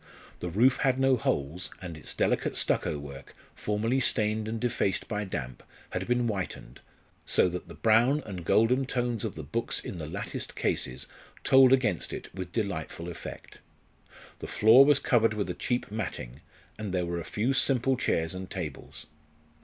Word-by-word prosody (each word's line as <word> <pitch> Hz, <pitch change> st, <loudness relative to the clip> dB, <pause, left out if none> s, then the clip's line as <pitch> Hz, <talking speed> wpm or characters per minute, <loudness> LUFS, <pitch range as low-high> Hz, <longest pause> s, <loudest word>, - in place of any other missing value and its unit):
The 90 Hz, -, -4 dB
roof 120 Hz, +9 st, +4 dB
had 130 Hz, -1 st, +1 dB
no 135 Hz, 0 st, +4 dB
holes, 80 Hz, -, -2 dB
and 90 Hz, -3 st, -7 dB
its 75 Hz, -, -7 dB
delicate -, -, +1 dB
stucco 75 Hz, -, 0 dB
work, 70 Hz, -1 st, -10 dB, 0.2 s
formerly 110 Hz, +5 st, 0 dB
stained 110 Hz, -3 st, +1 dB
and 110 Hz, +1 st, -3 dB
defaced 110 Hz, -5 st, 0 dB
by 105 Hz, -1 st, -2 dB
damp, 65 Hz, -9 st, -5 dB, 0.3 s
had -, -, -3 dB
been 125 Hz, 0 st, +2 dB
whitened, 95 Hz, -, -4 dB, 0.4 s
so -, -, +3 dB
that 90 Hz, +1 st, -6 dB
the -, -, -10 dB
brown 120 Hz, +7 st, +3 dB
and 95 Hz, -5 st, -6 dB
golden 125 Hz, +9 st, +3 dB
tones 120 Hz, -4 st, -1 dB
of 110 Hz, -5 st, -3 dB
the 80 Hz, -, -6 dB
books 105 Hz, +12 st, -2 dB
in 90 Hz, -, -7 dB
the 75 Hz, -, -5 dB
latticed -, -, -5 dB
cases 65 Hz, 0 st, -2 dB, 0.4 s
told 130 Hz, -1 st, +7 dB
against 120 Hz, -10 st, +2 dB
it -, -, -7 dB
with 90 Hz, -1 st, -6 dB
delightful 90 Hz, -5 st, -3 dB
effect. 85 Hz, -, -9 dB, 0.8 s
The -, -, -6 dB
floor 115 Hz, +6 st, +7 dB
was 145 Hz, -1 st, +5 dB
covered 115 Hz, -5 st, +2 dB
with 100 Hz, -4 st, -2 dB
a -, -, -3 dB
cheap 110 Hz, +6 st, -2 dB
matting, 75 Hz, -, -5 dB, 0.4 s
and 105 Hz, -3 st, -4 dB
there 90 Hz, -1 st, 0 dB
were 85 Hz, 0 st, -3 dB
a -, -, -5 dB
few 115 Hz, +10 st, -1 dB
simple 135 Hz, -1 st, +2 dB
chairs 80 Hz, -8 st, 0 dB
and 95 Hz, 0 st, -7 dB
tables. 85 Hz, -7 st, -6 dB
105 Hz, 170 wpm, -28 LUFS, 85-120 Hz, 0.8 s, told